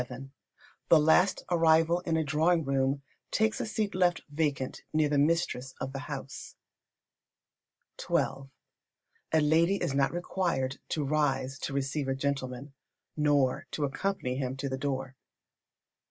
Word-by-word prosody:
The 165 Hz, -, +7 dB
last 160 Hz, +5 st, +3 dB
arrival 165 Hz, 0 st, +4 dB
in 165 Hz, -2 st, -1 dB
a 160 Hz, -, +1 dB
drawing 160 Hz, +3 st, +2 dB
room 135 Hz, +1 st, 0 dB, 0.3 s
takes 220 Hz, 0 st, +1 dB
a -, -, -3 dB
seat 215 Hz, -2 st, -2 dB
left 180 Hz, -2 st, +2 dB
vacant 145 Hz, -4 st, -1 dB
near 155 Hz, -1 st, +2 dB
the 145 Hz, -1 st, +1 dB
mistress 140 Hz, -4 st, 0 dB
of 135 Hz, 0 st, -4 dB
the 135 Hz, -, -4 dB
house. 135 Hz, -2 st, -7 dB, 1.5 s
xii. -, -, -2 dB, 1.2 s
A 160 Hz, -, +4 dB
lady 165 Hz, +5 st, +3 dB
is 175 Hz, -7 st, -2 dB
not 135 Hz, 0 st, +2 dB
required 170 Hz, -6 st, -2 dB
to 155 Hz, -, -1 dB
rise 135 Hz, -2 st, 0 dB
to -, -, -4 dB
receive 140 Hz, +1 st, -1 dB
a 135 Hz, -, 0 dB
gentleman, 135 Hz, 0 st, -3 dB, 0.4 s
nor 145 Hz, -4 st, +2 dB
to 150 Hz, -, -3 dB
accompany 135 Hz, -3 st, -2 dB
him 130 Hz, -1 st, -3 dB
to 140 Hz, -, -3 dB
the 130 Hz, -, -2 dB
door. 135 Hz, -1 st, -3 dB
145 Hz, 140 wpm, -29 LUFS, 135-165 Hz, 1.5 s, The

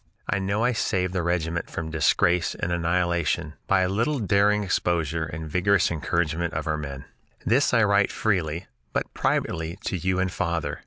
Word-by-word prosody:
I 100 Hz, -, 0 dB
know 100 Hz, +3 st, 0 dB
I 125 Hz, -, +3 dB
saved 90 Hz, -5 st, 0 dB
the 90 Hz, -, 0 dB
regiment 85 Hz, -1 st, -1 dB
from 80 Hz, -1 st, -5 dB
disgrace 85 Hz, +2 st, +2 dB
and 85 Hz, -, -3 dB
annihilation 85 Hz, -2 st, 0 dB
by 95 Hz, -1 st, +3 dB
a 90 Hz, -, +2 dB
little 115 Hz, +10 st, 0 dB
daring 105 Hz, -1 st, +2 dB
exposure 85 Hz, -4 st, 0 dB
and 80 Hz, 0 st, -6 dB
vigorous 90 Hz, +4 st, +2 dB
encouragement 85 Hz, +1 st, -1 dB
of -, -, -2 dB
our 80 Hz, -1 st, 0 dB
men. 70 Hz, -3 st, -6 dB, 0.4 s
This 130 Hz, +5 st, +3 dB
I 115 Hz, -2 st, +4 dB
write 100 Hz, -1 st, +3 dB
freely, 90 Hz, -5 st, -1 dB, 0.3 s
but -, -, -2 dB
privately, 80 Hz, +2 st, -1 dB
to 95 Hz, -, -1 dB
you 95 Hz, +2 st, 0 dB
and 95 Hz, 0 st, 0 dB
father. 85 Hz, -6 st, -2 dB
85 Hz, 170 wpm, -25 LUFS, 80-100 Hz, 0.4 s, I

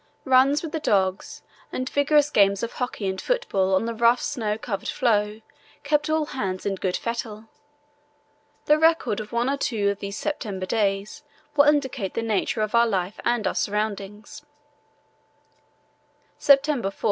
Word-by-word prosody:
Runs 270 Hz, +3 st, +4 dB
with 320 Hz, -, -5 dB
the 320 Hz, -, -2 dB
dogs 190 Hz, -8 st, -1 dB, 0.3 s
and 255 Hz, -, -3 dB
vigorous 290 Hz, +1 st, +2 dB
games 200 Hz, -2 st, +3 dB
of 235 Hz, -, -2 dB
hockey 245 Hz, -5 st, -4 dB
and 190 Hz, 0 st, -3 dB
football 195 Hz, -, 0 dB
on 190 Hz, -, +1 dB
the 230 Hz, -, -2 dB
rough 235 Hz, +2 st, +3 dB
snow 220 Hz, -7 st, -2 dB
covered 205 Hz, -3 st, -4 dB
floe 210 Hz, -3 st, 0 dB, 0.4 s
kept 295 Hz, +1 st, +1 dB
all 315 Hz, 0 st, +1 dB
hands 195 Hz, -10 st, -4 dB
in 200 Hz, -, 0 dB
good 185 Hz, -1 st, -2 dB
fettle. 225 Hz, -2 st, -5 dB, 1.2 s
The 300 Hz, +1 st, +4 dB
record 320 Hz, -10 st, +2 dB
of 215 Hz, -1 st, -7 dB
one 235 Hz, +1 st, 0 dB
or 280 Hz, +1 st, 0 dB
two 215 Hz, -7 st, 0 dB
of 200 Hz, -, -6 dB
these 200 Hz, +1 st, -5 dB
September 205 Hz, -11 st, -4 dB
days 205 Hz, +6 st, -1 dB, 0.3 s
will 285 Hz, -1 st, +6 dB
indicate 270 Hz, -9 st, 0 dB
the 230 Hz, -, -1 dB
nature 215 Hz, -1 st, -1 dB
of 215 Hz, 0 st, -2 dB
our 235 Hz, 0 st, +5 dB
life 190 Hz, -2 st, -2 dB
and 240 Hz, -3 st, 0 dB
our -, -, 0 dB
surroundings: 210 Hz, +3 st, -3 dB, 2.0 s
"September 275 Hz, -6 st, +3 dB
4. 195 Hz, -, -16 dB
225 Hz, 160 wpm, -24 LUFS, 200-275 Hz, 2.0 s, will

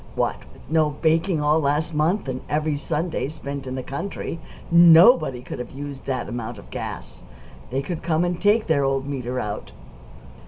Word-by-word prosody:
(What -, -, -1 dB
with -, -, -18 dB
no 155 Hz, -1 st, +2 dB
baking 165 Hz, +1 st, +2 dB
all 150 Hz, +2 st, +3 dB
last 150 Hz, +3 st, 0 dB
month, 160 Hz, +5 st, +1 dB
and 130 Hz, 0 st, -3 dB
every 150 Hz, 0 st, 0 dB
Sunday 155 Hz, 0 st, -2 dB
spent 140 Hz, -3 st, -6 dB
in 130 Hz, -, -4 dB
the 130 Hz, -, -4 dB
country, 165 Hz, +4 st, -5 dB, 0.3 s
nobody 170 Hz, -, +7 dB
could -, -, -7 dB
have 125 Hz, -, -7 dB
used 140 Hz, 0 st, -7 dB
that 130 Hz, -2 st, -2 dB
amount 120 Hz, -1 st, -5 dB
of 100 Hz, -, -14 dB
gas. -, -, -6 dB, 0.5 s
They 135 Hz, +3 st, -2 dB
could 170 Hz, +1 st, -4 dB
come 165 Hz, 0 st, +1 dB
and 175 Hz, 0 st, -2 dB
take 210 Hz, +3 st, +3 dB
their 145 Hz, -3 st, +2 dB
old 135 Hz, 0 st, 0 dB
meter 130 Hz, -3 st, -3 dB
out!) 105 Hz, -3 st, -5 dB
150 Hz, 180 wpm, -23 LUFS, 135-165 Hz, 0.5 s, nobody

